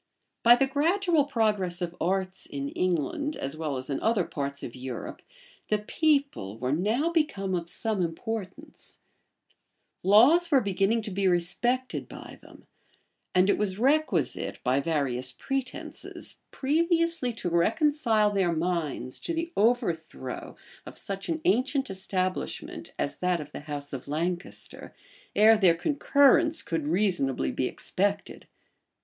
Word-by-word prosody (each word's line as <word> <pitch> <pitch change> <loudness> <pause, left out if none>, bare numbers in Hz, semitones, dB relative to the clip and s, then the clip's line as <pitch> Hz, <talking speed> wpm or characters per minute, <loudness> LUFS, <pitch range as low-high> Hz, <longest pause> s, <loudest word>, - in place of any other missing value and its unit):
By 235 +1 +8
the 270 - +2
gradual 320 +3 +2
progress 210 -9 0
of 175 -1 -4
arts 190 +2 -1
in 140 0 -4
England, 185 - -1
as 135 +2 -5
well 155 -4 -3
as 130 - -7
in 140 - -2
other 220 -4 +2
parts 140 -3 -5
of 120 - -7
Europe, 130 -2 -6 0.5
the 215 - +3
people 275 - 0
were 125 +2 -2
now 220 - +1
become 250 - 0
of 170 -1 -2
some 220 -1 -2
importance; 185 +3 -5 1.0
laws 255 - +6
were 280 -4 +5
beginning 200 +1 +1
to 210 - -4
be 195 +1 0
respected 240 +9 0
by - - -11
them; - - -17 0.7
and 185 +1 +5
it 200 - +2
was 195 -3 -1
requisite, 250 - +1
by 130 +2 +2
various 140 -5 -1
pretences, 265 - -6
previously 335 -1 +1
to 220 - -4
reconcile 225 - +2
their 190 -4 +1
minds 160 -7 -2
to 335 - -3
the 335 +1 -3
overthrow 175 - -1 0.3
of - - -11
such 195 -1 -6
an 325 - -1
ancient 260 +3 +1
establishment 185 -1 -3
as - - -2
that 180 -1 0
of 150 -1 -8
the - - -7
house 145 -1 -7
of 135 0 -6
Lancaster, 170 +5 -4 0.4
ere 220 +1 +6
their 180 -5 +5
concurrence 290 - +3
could 160 -3 -2
reasonably 160 - +1
be - - -1
expected. - - -2
195 Hz, 135 wpm, -27 LUFS, 165-265 Hz, 1.0 s, By